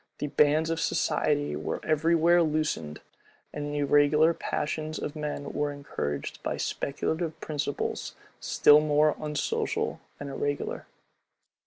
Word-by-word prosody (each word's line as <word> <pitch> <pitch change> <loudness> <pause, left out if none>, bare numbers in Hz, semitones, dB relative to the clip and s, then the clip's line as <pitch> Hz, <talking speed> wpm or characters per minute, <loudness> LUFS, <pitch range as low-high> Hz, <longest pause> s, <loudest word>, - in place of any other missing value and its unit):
The - - -3
bands 150 +3 +3
of 165 - -1
society 75 - 0
were 75 +1 -3
every 160 +2 +2
where 170 +2 +5
loosened; 150 - -1 0.5
and 145 0 -4
the 145 - -3
irregular 145 +3 +4
passions 155 0 -3
of 150 - -5
men 150 -1 -4
were 145 0 -1
encouraged 75 - -5
by - - -3
speculative 160 +3 -2
principles, 145 -2 -3 0.2
still 150 0 +5
more 150 0 +3
unsocial 150 -2 -2 0.2
and 145 - -6
irregular. 145 +1 -3
150 Hz, 125 wpm, -28 LUFS, 145-155 Hz, 0.5 s, where